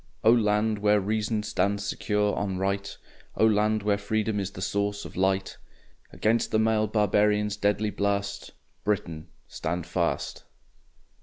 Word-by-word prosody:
O 110 - +7
land 105 -2 +2
where 105 0 +4
reason 105 +2 -1
stands 100 0 0
secure 105 +1 0
on 95 -2 -2
right, 100 +1 -2 0.4
O - - +5
land 105 0 +2
where 100 -1 +1
freedom 110 0 -1
is 95 -1 -2
the 95 - -11
source 100 +2 -2
of - - -10
light, 95 +1 0 0.5
Against 115 +2 +1
the - - +1
mailed 110 -1 +2
Barbarians' 105 -1 +2
deadly 105 +1 0
blast, 100 0 -2 0.3
Britain, 85 -6 -2 0.2
stand 85 +1 -3
fast! 85 -1 -2
105 Hz, 140 wpm, -27 LUFS, 100-105 Hz, 0.5 s, O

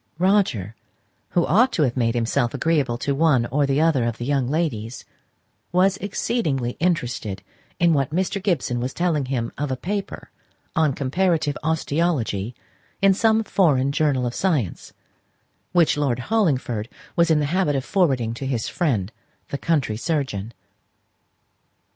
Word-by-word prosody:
Roger, 175 - +1 0.5
who 175 - +2
ought 235 +9 +4
to 160 - +1
have 125 -4 0
made 115 -2 +1
himself 120 0 0
agreeable 145 -7 +1
to 140 +3 -1
one 140 -5 +3
or 140 +1 +2
the 135 +1 +1
other 155 -7 +3
of 115 -1 -2
the 120 - -5
young 135 -2 +1
ladies, 125 -8 -2 0.7
was 185 +2 +3
exceedingly 195 - -1
interested 125 - -1 0.4
in 170 -1 +4
what 140 -3 +1
Mr. 190 +4 -1
Gibson 155 - 0
was 125 +2 -3
telling 165 -5 0
him 125 -3 -2
of 145 -1 -1
a 130 - -2
paper 195 +8 -5 0.4
on 155 -3 +3
comparative 155 +2 0
osteology 150 - -1 0.4
in 195 -1 +5
some 220 +2 +3
foreign 145 -10 +2
journal 140 -4 +1
of 120 - -2
science, 150 - -1 0.8
which 170 -4 +3
Lord 140 -5 +1
Hollingford 130 - 0 0.3
was 170 -1 +3
in 160 -2 +4
the 150 - +1
habit 185 -6 +2
of 135 -1 -2
forwarding 135 - +1
to 135 +3 -5
his 120 -5 -1
friend 115 - -1 0.4
the 140 - -3
country 140 -10 0
surgeon. 120 - -2
145 Hz, 150 wpm, -23 LUFS, 120-175 Hz, 0.8 s, in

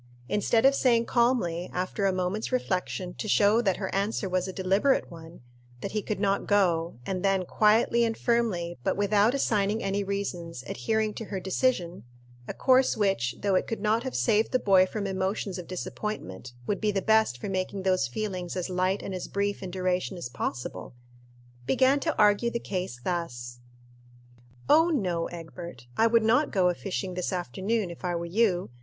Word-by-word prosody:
Instead 225 - +2
of 275 - +7
saying 235 -4 +3
calmly, 230 -9 +1
after 185 +2 -1
a - - +3
moment's 185 +5 -2
reflection, 185 -6 -2
to 215 - -6
show 210 +2 +4
that 195 -6 +1
her 190 -2 -4
answer 200 +1 -1
was 185 0 -1
a - - -4
deliberate 195 +8 +1
one, 165 0 -12 0.4
that - - -4
he 215 - -1
could 205 -1 -3
not 200 -1 0
go, 175 -5 +2
and 185 -1 -2
then 195 -1 +1
quietly 220 +4 +3
and 225 -1 0
firmly, 200 - 0
but - - 0
without 205 +4 +3
assigning 215 -4 +1
any 200 +1 0
reasons, 180 -8 -4
adhering 215 - -1
to 225 - -6
her 195 -2 -4
decision 185 -2 -1 0.4
a - - -4
course 260 0 +3
which, 160 - +1
though 200 -1 +1
it 185 - +1
could 225 - -3
not 215 +2 +1
have 260 +1 -5
saved 220 -1 +2
the 255 - +3
boy 190 -5 +4
from 205 +1 -4
emotions 190 0 -2
of 175 - -8
disappointment, 175 - -5
would 200 - -2
be 215 - +1
the 195 - 0
best 220 - +3
for - - -5
making 190 0 -3
those 185 -7 +2
feelings 180 - -4
as 185 0 -3
light 185 +2 0
and 195 - -5
as 185 - -4
brief 200 0 -2
in 190 - -5
duration 185 +1 -1
as 150 -8 -5
possible 120 0 -5 0.7
began 265 +2 +3
to 320 +1 -2
argue 210 +2 +4
the 235 - -2
case 185 - -4
thus; 120 -9 -4 1.1
"Oh 325 +2 +5
no, 180 - 0
Egbert, 170 -6 -9
I 225 - +4
would 230 0 +3
not 245 +7 +3
go 185 -3 +2
a - - +1
fishing 185 0 -4
this 180 0 -2
afternoon, 190 - -2
if 170 - -12
I 175 -1 -1
were 170 0 -3
you. 180 - +1
195 Hz, 185 wpm, -27 LUFS, 180-220 Hz, 1.1 s, of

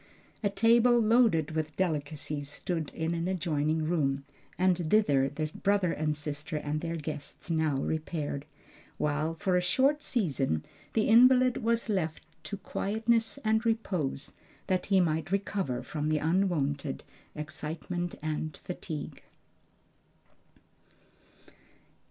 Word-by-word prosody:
A 205 - +2
table 235 +4 +5
loaded 220 -9 +4
with 155 -1 -3
delicacies 150 -4 -2
stood 160 0 -3
in 160 +1 -1
an 170 +1 -1
adjoining 155 -3 0
room, 140 -5 0 0.3
and 185 0 +4
thither 145 -11 +4
the 155 +2 -3
brother 200 -3 +2
and 150 0 -1
sister 150 +1 -4
and 150 0 -2
their 170 -1 -3
guests 150 +1 -6
now 160 -3 +2
repaired, 155 -1 -2 0.5
while 150 +2 0
for 180 +2 0
a 180 - +3
short 270 +11 +3
season 135 - 0 0.3
the 220 - +2
invalid 250 +2 +6
was 230 0 0
left 170 -7 -1 0.2
to 205 - -4
quietness 225 +5 0
and 220 +1 +3
repose 185 - -1 0.3
that 185 -2 0
he 195 -2 +4
might 160 -1 0
recover 195 -9 -1
from 150 -1 -3
the 155 - +2
unwonted 150 -5 0 0.3
excitement 160 +3 -4
and 155 -1 -3
fatigue. 165 -4 -6
165 Hz, 120 wpm, -30 LUFS, 150-200 Hz, 0.5 s, invalid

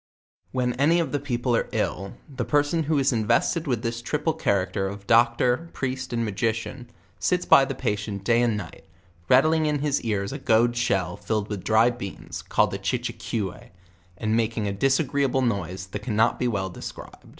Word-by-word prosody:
When 125 -1 0
any 165 +5 +4
of 165 - -1
the 145 - 0
people 125 -3 -1
are - - 0
ill, 95 +1 -2
the 130 -4 -4
person 145 +6 +1
who 155 0 +1
is 135 0 +3
inves 110 -4 +2
ted 165 -2 -4
with 125 -3 -1
this 115 0 -2
triple 150 +6 -1
character 95 - 0
of 100 0 -7
doctor, 120 +7 +3
priest 130 -1 -3
and 115 -1 0
magician, 115 +4 -3 0.4
Bits 180 0 +1
by 135 - +7
the 135 0 -4
palient 105 -5 -3
day 120 +2 +3
and 115 -3 +1
night, 85 -4 -9 0.4
rattling 155 +4 +4
in 150 -1 +1
his 145 0 0
ears 100 -3 -2
a - - -5
goad 120 +2 +3
shell 100 -7 0
filled 105 0 -2
with 105 -4 -4
dry 110 +2 +4
beans, 120 -5 -7
called - - +1
a - - -3
Chichicoue, 95 -5 -3 0.5
and 110 +2 0
making 115 -2 0
a 100 - -1
disagreeable 135 +3 +1
noise 95 -5 -2
that 95 +3 -6
cannot 110 0 +1
b3 125 - +1
well 95 -4 -2
described. - - -10
120 Hz, 185 wpm, -25 LUFS, 105-135 Hz, 0.5 s, by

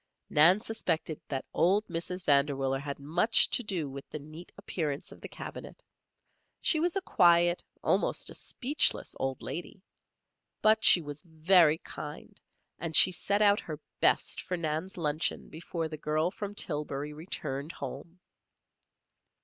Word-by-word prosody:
Nan 170 +7 +6
suspected 175 -8 -3
that 135 -2 -4
old 195 +5 +2
Mrs. 180 +2 -4
Vanderwiller 140 -2 +2
had 140 0 -5
much 170 +11 +3
to - - +3
do 185 -9 -3
with 135 0 -9
the - - -6
neat 155 +4 -12
appearance 155 -8 -4
of - - -14
the - - -7
cabinet. - - -9 0.8
She 315 - +2
was 345 +3 0
a 390 - 0
quiet, 175 - +3 0.2
almost - - 0
a - - -8
speechless, 280 +4 0
old 135 -1 -3
lady. 180 +3 -6 0.8
But 215 0 +4
she 175 - +7
was 145 0 -7
very 160 -1 +4
kind - - -9 0.4
and 165 -2 -4
she 185 - +8
set 200 +3 0
out 205 0 +4
her 155 -2 -7 0.2
best - - +2
for 180 - -4
Nan's 160 +3 -3
luncheon 155 -1 -1
before 165 0 -5
the 155 -1 -7
girl 155 +3 0
from 205 +1 -6
Tillbury 150 -4 -3
returned 150 -2 -4
home. 145 +6 -8
165 Hz, 145 wpm, -29 LUFS, 150-185 Hz, 0.8 s, she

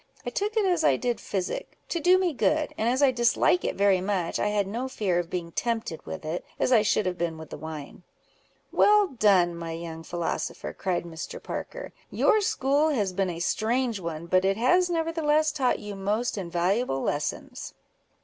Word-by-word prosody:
I - - -3
took 420 +2 -2
it 425 - +3
as 355 -4 +2
I - - +4
did 245 -3 -2
physic, 200 - -4
to 340 - -1
do 360 +3 +5
me 365 -3 +1
good; 300 +3 +1
and 220 +2 0
as 260 +3 +2
I 270 - +6
dislike 240 +8 +3
it - - -1
very 195 -2 +3
much, 185 -3 -1
I - - +1
had 210 -1 +1
no 235 +7 -3
fear 200 -9 0
of 170 -1 -4
being 170 -2 -4
tempted 225 -6 -3
with 185 -3 -6
it, 160 +3 -3 0.2
as - - +1
I 235 -4 +6
should 210 -1 +1
have 180 -1 -2
been 170 -2 -1
with 160 -1 -10
wine." 155 +1 -8 0.7
"Well 415 -2 +5
done, 195 - +3
my 165 -1 -5
young 165 -1 -6
philosopher!" 170 0 -3
cried 185 -2 -2
Mr. 160 -2 -7
Parker. - - -6 0.2
"Your 430 - +3
school 290 -4 +2
has 205 -10 0
been 190 0 0
a 170 -1 -5
strange 230 +5 0
one, 165 -2 -5
but 185 +2 +2
it 195 +1 +2
has 355 +10 +3
nevertheless 320 -2 +1
taught 270 -4 +1
you 210 -1 -7
most 205 +5 -1
invaluable 180 - 0
lessons." 145 0 -3
210 Hz, 190 wpm, -27 LUFS, 175-280 Hz, 0.7 s, I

